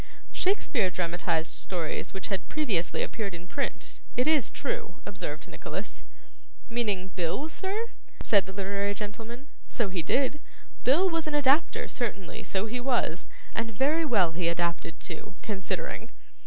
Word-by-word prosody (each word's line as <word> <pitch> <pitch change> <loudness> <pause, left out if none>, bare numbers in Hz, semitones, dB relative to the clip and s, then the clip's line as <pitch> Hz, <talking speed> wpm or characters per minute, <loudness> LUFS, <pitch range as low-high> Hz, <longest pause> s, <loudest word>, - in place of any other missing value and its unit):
'Shakespeare 285 - +2
dramatised 170 -2 +1
stories 170 -1 -2
which 190 0 -4
had 190 -3 -2
previously 220 - +1
appeared 200 -5 -2
in 170 +1 -8
print, 275 +9 -3 0.2
it 250 +3 +4
is 305 -7 +5
true,' 180 - -3
observed 155 -7 -4
Nicholas. - - -5 0.7
'Meaning 205 -6 +1
Bill, 180 - 0
sir?' 395 +7 -1 0.4
said 200 -3 +5
the - - -5
literary 200 +1 0
gentleman. 225 +6 -5 0.2
'So 230 -5 +1
he 185 -2 0
did. 270 - +2 0.4
Bill 315 +10 +6
was 330 -3 0
an 300 - 0
adapter, 290 +2 +4
certainly, 205 -7 -2
so 195 +1 0
he 240 +3 -1
was 245 0 +1 0.3
and 225 -1 -1
very 305 +6 +4
well 205 - +4
he 170 +1 0
adapted 170 -1 0
too 165 +2 -6
considering. 200 -4 -2
205 Hz, 140 wpm, -30 LUFS, 180-270 Hz, 0.7 s, Bill